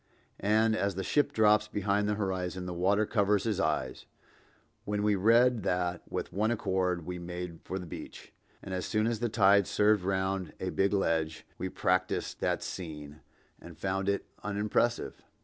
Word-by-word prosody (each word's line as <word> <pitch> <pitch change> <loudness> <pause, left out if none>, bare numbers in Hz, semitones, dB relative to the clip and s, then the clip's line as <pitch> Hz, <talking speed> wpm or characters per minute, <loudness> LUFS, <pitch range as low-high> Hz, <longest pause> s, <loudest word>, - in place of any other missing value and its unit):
And 110 +2 +3
as 100 -3 0
the 95 - -3
ship 145 +9 +2
drops 105 -1 +4
behind 105 0 0
the 105 - +1
horizon, 95 -2 -2
the 90 - -4
water 100 +5 +2
covers 100 -2 +2
his 110 -4 -1
eyes—when 105 +1 -5
we 105 0 +3
read 115 +4 +4
that, 90 -1 -1
with - - -4
one 105 +4 +1
accord 95 -6 0
we 90 0 -5
made 90 -1 -6
for 95 - -4
the 90 - -6
beach, 80 - -9 0.3
and 95 - -6
as 90 -1 -2
soon 110 0 +1
as 115 -1 0
the 120 0 0
tide 100 -2 +4
served 105 -2 +3
round 95 -2 -1
a 95 -1 -2
big 95 0 +1
ledge, 80 -5 0
we 95 - -2
practiced 90 0 -1
that - - 0
scene, 75 -4 -7 0.4
and - - -12
found 95 +1 -1
it 100 - -1 0.2
unimpressive. 105 +3 -1
95 Hz, 165 wpm, -30 LUFS, 90-105 Hz, 0.4 s, drops